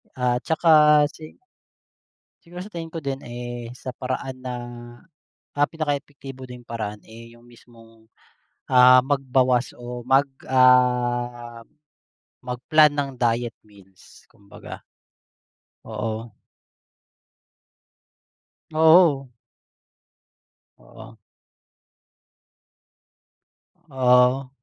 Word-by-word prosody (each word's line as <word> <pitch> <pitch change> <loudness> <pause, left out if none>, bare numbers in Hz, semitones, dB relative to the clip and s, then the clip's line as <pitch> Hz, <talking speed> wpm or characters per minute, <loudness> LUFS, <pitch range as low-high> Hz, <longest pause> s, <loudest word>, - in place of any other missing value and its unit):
Ah, 125 -1 0
'tsaka 150 -2 +4
si 155 -1 -13 1.1
siguro 175 +2 -9
sa 210 - -13
tingin 165 -1 -6
ko 160 -2 -8
din, 135 -1 -4
eh, 120 -1 -8
sa 130 0 -7
paraan 130 +1 -5
ng, 125 -1 -6 0.9
ah, 145 - +4
pinaka 150 -3 -2
epektibo 135 -2 -12
ding 125 -1 -11
paraan, 105 -3 -6
eh, 115 +1 -14
'yung 120 - -21
mismong, 115 -2 -20 0.6
ah, 125 0 +7
magbawas 130 -3 0
o 120 0 -9
mag 135 +2 +3 0.2
ah, 120 -2 +1 0.8
mag-plan 145 +5 +3
ng 145 -1 -3
diet 120 -1 -1
meals 100 -3 -21
kumbaga. 100 -1 -13 1.0
Oo. 110 +1 -5 2.4
Oo. 160 -4 +4 1.5
Oo. 115 0 -15 2.7
Ah. 130 0 +2
125 Hz, 85 wpm, -23 LUFS, 120-140 Hz, 2.7 s, ah